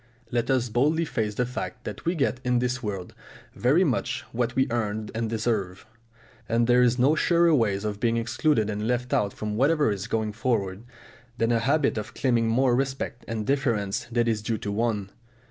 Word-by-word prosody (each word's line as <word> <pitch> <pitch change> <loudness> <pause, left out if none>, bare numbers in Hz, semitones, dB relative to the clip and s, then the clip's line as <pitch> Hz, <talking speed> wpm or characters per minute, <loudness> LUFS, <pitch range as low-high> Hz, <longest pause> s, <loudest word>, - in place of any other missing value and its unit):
Let 120 -1 0
us 130 -2 +2
boldly 150 +8 +1
face 110 -7 -2
the 125 - +1
fact 125 0 -6
that - - -7
we 170 +2 +1
get 135 -4 0
in 125 -1 +2
this 125 +1 -1
world 100 -5 -5 0.4
very 145 +10 +3
much 125 -4 -1
what 120 0 -1
we 130 - +3
earn 110 -2 -2
and 115 0 -2
deserve, 110 -5 -2 0.6
and 115 +1 +2
there 125 +1 +4
is 125 0 +3
no 135 +4 +4
surer 170 +1 +3
way 115 -8 +3
of 105 +1 -4
being 115 0 +1
excluded 120 0 +1
and 105 0 -3
left 125 +1 -1
out 100 -1 +2
from 105 +1 -4
whatever 145 -1 +3
is 100 +1 -4
going 110 -1 -1
forward 110 -3 -1 0.5
than 115 -1 +1
a 115 - +3
habit 140 0 +1
of 105 - -8
claiming 120 -4 +1
more 125 +2 +3
respect 135 -2 -2
and 110 -2 -3
deference 115 -8 0
than 120 0 0
is 110 -2 0
due 110 +1 -2
to 100 - -4
one. 105 -2 -1
120 Hz, 195 wpm, -26 LUFS, 110-130 Hz, 0.6 s, there